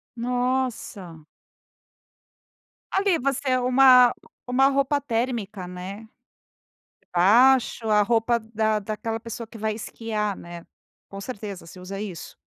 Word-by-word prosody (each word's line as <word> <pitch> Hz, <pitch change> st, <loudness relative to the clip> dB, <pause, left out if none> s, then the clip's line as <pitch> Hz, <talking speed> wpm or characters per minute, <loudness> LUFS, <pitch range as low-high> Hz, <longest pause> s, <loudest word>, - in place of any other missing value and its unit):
Nossa! 245 Hz, -9 st, -3 dB, 1.7 s
Ali 385 Hz, -3 st, +2 dB
você 265 Hz, 0 st, 0 dB
uma 250 Hz, 0 st, +6 dB, 0.3 s
uma 260 Hz, +2 st, +3 dB
roupa 275 Hz, +1 st, +1 dB
térmica, 230 Hz, -7 st, -3 dB
né? 190 Hz, +5 st, -8 dB, 0.9 s
Debaixo, 230 Hz, +5 st, +3 dB
a 210 Hz, -1 st, +4 dB
roupa 235 Hz, +1 st, +1 dB
da 220 Hz, -1 st, -1 dB
daquela 220 Hz, +2 st, -4 dB
pessoa 230 Hz, 0 st, -7 dB
que 225 Hz, -, -12 dB
vai 215 Hz, 0 st, -1 dB
esquiar, 215 Hz, -2 st, -4 dB
né. 170 Hz, 0 st, -10 dB, 0.5 s
Com 195 Hz, -, -8 dB
certeza 200 Hz, -5 st, -7 dB
se 180 Hz, -, -12 dB
usa 195 Hz, +2 st, -7 dB
isso. 190 Hz, -6 st, -7 dB
225 Hz, 110 wpm, -24 LUFS, 200-250 Hz, 1.7 s, uma